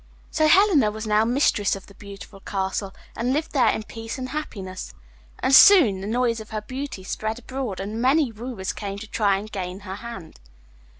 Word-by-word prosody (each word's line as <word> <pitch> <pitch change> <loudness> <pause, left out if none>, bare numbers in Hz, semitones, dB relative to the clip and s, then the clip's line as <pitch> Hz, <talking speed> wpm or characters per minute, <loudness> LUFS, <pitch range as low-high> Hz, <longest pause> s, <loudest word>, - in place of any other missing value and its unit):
So 310 0 +2
Helena 340 - +5
was 215 +1 -6
now 215 0 +3
mistress 235 -5 +2
of 195 - -10
the 200 - -16
beautiful 200 0 -11
castle, 195 0 -3 0.2
and 245 +3 -1
lived 310 +3 -2
there 270 -4 +3
in 220 - -1
peace 225 +2 -7
and 255 0 -5
happiness. 195 -11 -6 0.4
And 270 - 0
soon 270 - +8
the 195 - -5
noise 235 0 0
of 220 - -10
her 215 -1 -4
beauty 260 -4 -6
spread 215 +4 -3
abroad, 245 -4 -5
and 210 +4 -4
many 270 +1 +3
wooers 225 -3 -5
came 200 -1 -5
to 220 +2 -8
try 205 -3 +1
and 210 +2 -8
gain 185 0 -5
her 190 0 -7
hand. 210 -8 -9
220 Hz, 190 wpm, -24 LUFS, 195-255 Hz, 0.4 s, soon